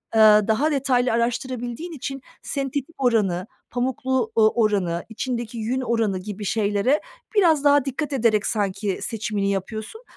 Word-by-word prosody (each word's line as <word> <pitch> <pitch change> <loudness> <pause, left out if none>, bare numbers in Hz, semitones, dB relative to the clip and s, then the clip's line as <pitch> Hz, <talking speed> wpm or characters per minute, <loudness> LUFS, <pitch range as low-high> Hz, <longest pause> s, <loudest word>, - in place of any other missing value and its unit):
eee, 220 - +4 0.3
daha 280 +8 +2
detaylı 255 -3 +2
araştırabildiğin 245 +5 -2
için 275 -3 -6 0.2
sentetik 275 +2 -3
oranı, 205 -6 +1 0.2
pamuklu 255 -1 -1
u 225 - +4 0.2
oranı, 185 -5 +1
içindeki 235 0 -4
yün 240 +4 -1
oranı 225 -6 0
gibi 205 +1 -6
şeylere 210 +7 +1 0.3
biraz 325 -8 +4
daha 285 -1 +5
dikkat 285 +2 -3
ederek 220 -5 +2
sanki 200 -2 -1
seçimini 210 -3 -2
yapıyorsun. 215 - -5
235 Hz, 130 wpm, -23 LUFS, 210-265 Hz, 0.3 s, daha